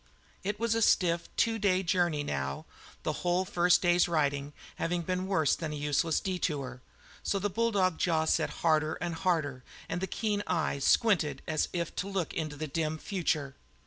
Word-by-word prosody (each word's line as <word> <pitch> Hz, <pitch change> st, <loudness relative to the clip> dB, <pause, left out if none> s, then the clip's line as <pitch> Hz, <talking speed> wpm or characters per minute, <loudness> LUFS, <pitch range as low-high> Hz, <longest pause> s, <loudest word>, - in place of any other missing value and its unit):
It 205 Hz, +2 st, -2 dB
was 230 Hz, -1 st, +1 dB
a 230 Hz, -, +1 dB
stiff 170 Hz, -5 st, +3 dB
two 225 Hz, -1 st, +2 dB
day 190 Hz, -2 st, +2 dB
journey, 170 Hz, -4 st, +1 dB
now, 70 Hz, -, -3 dB, 0.4 s
the -, -, 0 dB
whole 180 Hz, +1 st, +1 dB
first 175 Hz, 0 st, +3 dB
day's 175 Hz, 0 st, +4 dB
riding 145 Hz, -3 st, 0 dB, 0.3 s
having 175 Hz, +1 st, -1 dB
been 185 Hz, +2 st, -1 dB
a -, -, -3 dB
worse 160 Hz, -7 st, +2 dB
than 160 Hz, -3 st, -4 dB
useless 150 Hz, +2 st, +1 dB
detour; 145 Hz, -9 st, -3 dB, 0.4 s
so 200 Hz, -, 0 dB
the 200 Hz, +1 st, -1 dB
bulldog 200 Hz, -5 st, +1 dB
jaw 160 Hz, -2 st, +2 dB
set -, -, +2 dB, 0.2 s
harder 155 Hz, -1 st, +3 dB
and 175 Hz, 0 st, -3 dB
harder, 160 Hz, -7 st, -1 dB, 0.2 s
and 175 Hz, -, -3 dB
the 190 Hz, -, -1 dB
keen 205 Hz, +2 st, -1 dB
eyes 140 Hz, -4 st, 0 dB
squinted 200 Hz, -10 st, +3 dB
as 155 Hz, -2 st, 0 dB
if 170 Hz, -2 st, -3 dB
to 190 Hz, -, -2 dB
look 190 Hz, -5 st, -2 dB
into 155 Hz, -2 st, -3 dB
the 155 Hz, +2 st, -4 dB
dim 155 Hz, +1 st, -2 dB
future. 155 Hz, -6 st, -1 dB
170 Hz, 175 wpm, -30 LUFS, 155-185 Hz, 0.4 s, day's